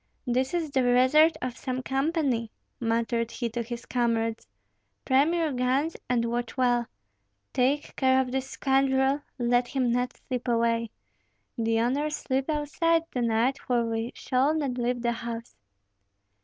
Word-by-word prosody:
"This 255 +4 0
is 325 -4 -2
the 265 - +2
resort 260 +6 +5
of 250 -1 -3
some 255 -1 -4
company," 270 -4 0 0.3
muttered 230 0 0
he 235 0 -3
to 240 +1 -2
his 235 +1 -6
comrades. 230 - -1 0.6
"Prime 275 +5 +4
your 325 -3 +1
guns 260 +5 0
and 240 -2 +2
watch 240 +2 -3
well. 245 -2 +2 0.7
Take 275 +4 0
care 260 -1 +4
of 255 -1 -1
this 265 0 -2
scoundrel, 270 +1 +2 0.2
let 245 0 +2
him 255 -3 0
not 245 +1 -1
slip 250 -1 -5
away. 230 -1 +1 0.7
The 225 -2 +1
owners 290 +5 0
sleep 270 +1 -2
outside 320 +2 +1
to 250 - -2
night, 235 +3 +1
for 240 -2 0
we 225 +1 -2
shall 270 +4 +1
not 275 -5 -2
leave 245 0 -1
the 235 - +2
house." 235 0 -6
250 Hz, 150 wpm, -27 LUFS, 235-270 Hz, 0.7 s, resort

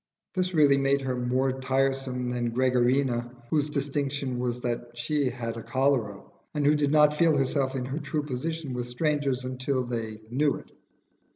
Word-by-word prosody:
This 185 -1 -1
really 145 -3 +6
made 140 0 +2
her 130 -1 -2
more 130 +2 +1
tiresome 135 -1 0
than 120 -1 -1
Gregarina, 125 -1 +2 0.2
whose 150 -1 +2
distinction 140 -2 -2
was 125 0 -2
that 120 0 -4
she 140 +2 0
had 115 -2 -4
had 115 - -8
cholera, 130 -7 +1 0.3
and 145 -1 +1
who 145 - +6
did 145 -1 +1
not 150 -1 +5
feel 165 -3 +4
herself 135 0 0
in 125 -1 -2
her 135 +4 -3
true 150 0 -2
position 150 +1 -4
with 125 -1 -3
strangers 140 0 0
until 130 +1 -1
they 115 -3 -4
knew 145 +3 +2
it. - - -11
135 Hz, 170 wpm, -27 LUFS, 125-145 Hz, 0.3 s, really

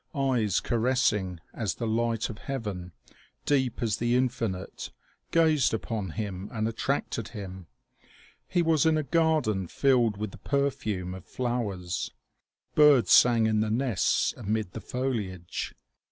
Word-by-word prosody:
Eyes 125 -8 +1
caressing 110 -7 +1
as 105 -5 -2
the 120 - -4
light 115 0 0
of 105 - -10
heaven, 105 -10 -5 0.5
deep 130 -3 +1
as 110 -2 0
the 120 +1 +1
infinite, 115 -7 -2 0.4
gazed 160 -7 +3
upon 110 -4 -3
him 100 -2 -4
and 110 -1 -1
attracted 115 0 -2
him. 95 -5 -8 0.8
He 175 -2 +1
was 160 -2 +3
in 160 -1 +4
a 155 - 0
garden 155 - +1
filled 120 - +2
with 105 -1 -4
the - - -12
perfume 130 -10 -1
of 95 -1 -9
flow 120 -4 -1
ers. 90 -1 -4 0.6
Birds 150 -5 +6
sang 120 -2 +6
in 110 -1 +2
the 110 0 +1
nests 120 -2 +1
amid 105 -2 -2
the - - -7
foliage. 105 -9 -3
115 Hz, 140 wpm, -28 LUFS, 100-130 Hz, 0.8 s, Birds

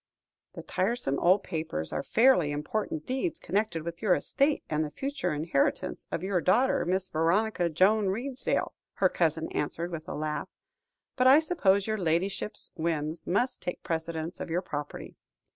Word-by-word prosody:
"The - - -8
tiresome 190 - -1
old 185 +3 +4
papers 155 - -2
are - - -1
fairly 230 - +4
important 155 +2 -3
deeds 265 +7 -2
connected 190 -5 -1
with 170 +1 -6
your 195 -5 +4
estate, 285 +1 +1
and 155 0 0
the 150 - -3
future 265 - -3
inheritance 145 - -1
of 165 - -2
your 190 -2 0
daughter, 260 +10 +3
Miss 190 +1 0
Veronica 175 +3 +1
Joan 195 +6 +3
Redesdale," 255 +7 -2 0.2
her 185 - +3
cousin 160 -2 0
answered 165 +4 -2
with 160 -2 -6
a - - -4
laugh; 150 0 -3 0.7
"but 255 0 +3
I 270 +3 +8
suppose 200 - +2
your 215 -1 -1
ladyship's 190 +5 -1
whims 160 -1 -2
must 245 +8 0
take 180 - -5
precedence 165 +1 -3
of - - -5
your 175 +3 -1
property. 145 -4 -6
180 Hz, 160 wpm, -29 LUFS, 160-215 Hz, 0.7 s, I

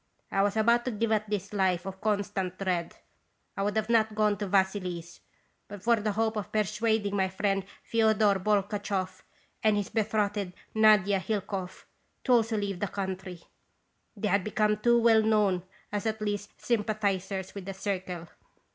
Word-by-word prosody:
I 195 - +2
was 205 +2 +1
about 235 +2 +4
to - - 0
give 225 +1 -1
up 215 -1 +1
this 200 -1 -3
life 190 -3 +1
of 190 0 -7
constant 200 -3 -1
dread. 180 -3 -2 0.6
I - - -3
would 205 +1 0
not 215 -1 0
have 220 -2 +3
gone 210 -1 +3
to 205 - -2
Vassily 190 -2 +1
's 170 +1 -14 0.5
but 205 -1 -10
for 235 0 +4
the 210 -1 -1
hope 220 +1 0
of 205 - -4
persuading 215 -1 0
my 190 -1 +1
friend 195 0 0 0.3
F6odor 220 -4 +3
Bolchakoff 200 -2 -1 0.4
and 215 -1 +3
his 205 -2 -2
betrothed, 205 -3 0 0.2
Nadia 210 -3 +5
Hilkoff, 190 -1 -4 0.4
to 255 - 0
also 225 -2 +3
leave 200 -3 -2
the 205 - -1
country. 190 -3 -5 0.7
They 210 +1 -1
had 200 -2 +2
become 210 0 +1
too 235 +2 +4
well 225 -1 +5
known 210 -5 +2 0.3
as 205 +2 -2
at 220 0 -1
least 205 -1 -4
'sympathizers' 200 -4 -1
with 200 -2 -7
the 195 0 -5
Circle. 185 -3 -4
205 Hz, 165 wpm, -29 LUFS, 190-215 Hz, 0.7 s, Nadia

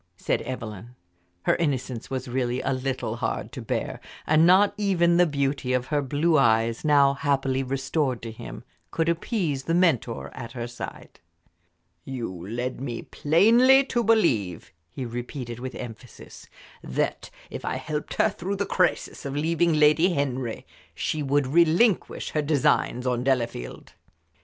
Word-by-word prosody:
said - - -1
Evelyn. 115 -2 -7 0.5
Her - - +3
innocence 130 -7 -2
was 130 0 -4
really 125 0 -1
a 135 - 0
little 130 0 -3
hard - - -3
to - - -7
bear, - - -3 0.3
and 160 +2 +4
not 195 +3 +5
even 175 -5 +2
the 175 0 +5
beauty 140 -3 -1
of 125 -1 0
her 145 - +3
blue 150 +4 +2
eyes, 115 -2 +2
now 140 -2 +5
happily 135 -2 0
restored 135 0 -1
to 115 - -5
him, 110 - -9 0.3
could 165 0 -1
appease 170 - -1
the 165 - +1
mentor 160 -10 +1
at 115 - -8
her 120 -2 -4
side. 120 0 -9 0.8
"You 130 -3 -4 0.2
led 125 +2 -3
me 120 -4 -4
plainly 235 - +5
to 240 -3 -1
believe," 125 - +1 0.2
he 130 +6 -5
repeated, 120 0 -6
with 130 +1 -6
emphasis, 120 0 -10 0.4
"that 65 - -2 0.2
if - - -6
I - - -2
helped 150 -1 -4
her - - +3
through 190 +3 -4
the 200 +1 -1
crisis 185 - 0
of 140 0 -4
leaving 165 +2 +1
Lady 155 +4 +4
Henry 130 -4 -2 0.3
she 155 - -2
would 145 0 +1
relinquish 170 - +2
her 150 - 0
designs 140 -4 +1
on 125 -1 0
Delafield." 120 - -2
140 Hz, 150 wpm, -25 LUFS, 125-165 Hz, 0.8 s, not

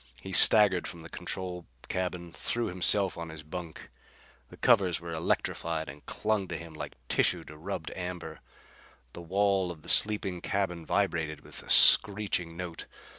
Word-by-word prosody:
He 95 - -10
staggered 95 0 +6
from 85 -1 -10
the 80 - -11
control 90 -2 -6 0.2
cabin; 90 -2 -4
threw 120 0 -3
himself 95 +1 +3
on 85 0 -7
his 80 -1 -10
bunk. 85 +1 -9 0.6
The - - -15
covers 100 -8 +2
were 85 0 -8
electrified 80 0 -3
and 70 +2 -12
clung 105 -3 -2
to 85 - -5
him 85 -1 -11
like 75 - -8
tissue - - 0
to 75 - -13
rubbed 80 +1 -6
amber. 90 -3 -7 0.7
The 85 - -9
wall 95 +1 0
of 80 -3 -10
the - - -8
sleeping 100 -4 +3
cabin 90 -4 -3
vibrated 80 -6 -2
with - - -10
a - - -15
screeching 95 -5 +5
note. 90 -2 -7
90 Hz, 160 wpm, -28 LUFS, 80-95 Hz, 0.7 s, staggered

